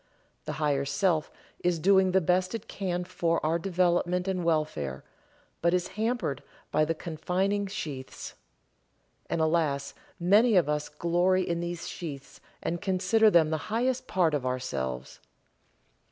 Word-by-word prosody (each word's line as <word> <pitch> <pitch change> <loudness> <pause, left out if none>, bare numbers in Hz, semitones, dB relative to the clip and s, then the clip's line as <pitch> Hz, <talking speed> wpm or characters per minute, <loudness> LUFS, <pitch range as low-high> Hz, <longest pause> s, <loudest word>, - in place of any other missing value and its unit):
The - - -3
Higher 145 -3 0
Self 155 +3 0 0.3
is 175 -1 +1
doing 190 +2 +4
the 190 +1 +3
best 180 +4 +1
it 225 0 -7
can 180 -2 -2
for 170 -2 0
our 165 +2 +1
development 180 0 +1
and 185 -2 -1
welfare, 150 - -1 0.6
but 170 +1 +3
is 180 0 -1
hampered 220 - -2 0.3
by 155 +1 +3
the 165 - -1
confining 185 +6 -1
sheaths. 145 -9 -6 1.0
And 165 - 0
alas, 155 -4 +1 0.3
many 210 +6 +5
of 175 -5 +4
us 150 0 -1
glory 180 +2 +1
in 170 0 -1
these 170 0 -4
sheaths 145 -6 -7 0.2
and 170 0 -2
consider 190 +4 +3
them 165 -5 +4
the 160 - +1
highest 255 +3 0
part 175 -4 +2
of 145 -3 0
ourselves. 70 - -3
175 Hz, 140 wpm, -28 LUFS, 155-185 Hz, 1.0 s, many